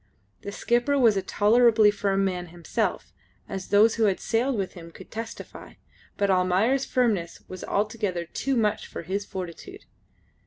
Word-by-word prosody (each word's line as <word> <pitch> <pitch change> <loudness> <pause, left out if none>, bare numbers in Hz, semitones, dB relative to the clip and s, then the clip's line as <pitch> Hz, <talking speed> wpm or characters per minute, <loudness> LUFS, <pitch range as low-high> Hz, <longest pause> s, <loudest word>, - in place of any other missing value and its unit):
The 200 - -6
skipper 240 +7 +1
was 230 -6 +5
a 195 - +1
tolerably 220 +2 +4
firm 195 -1 0
man 180 -2 -2
himself 170 -1 -3 0.3
as 190 -1 -6
those 215 +3 +4
who 225 - +3
had 195 -3 +1
sailed 240 +2 0
with 195 -2 -3
him 170 -2 -11
could - - -14
testify 225 +1 -8 0.4
but 200 -1 +2
Almayer's 190 +9 +2
firmness 210 -10 0
was 185 -1 -8
altogether 205 -4 -1
too 270 +9 -2
much 210 -2 0
for - - -7
his 195 +4 -3
fortitude. 190 - -8
205 Hz, 155 wpm, -26 LUFS, 185-230 Hz, 0.4 s, was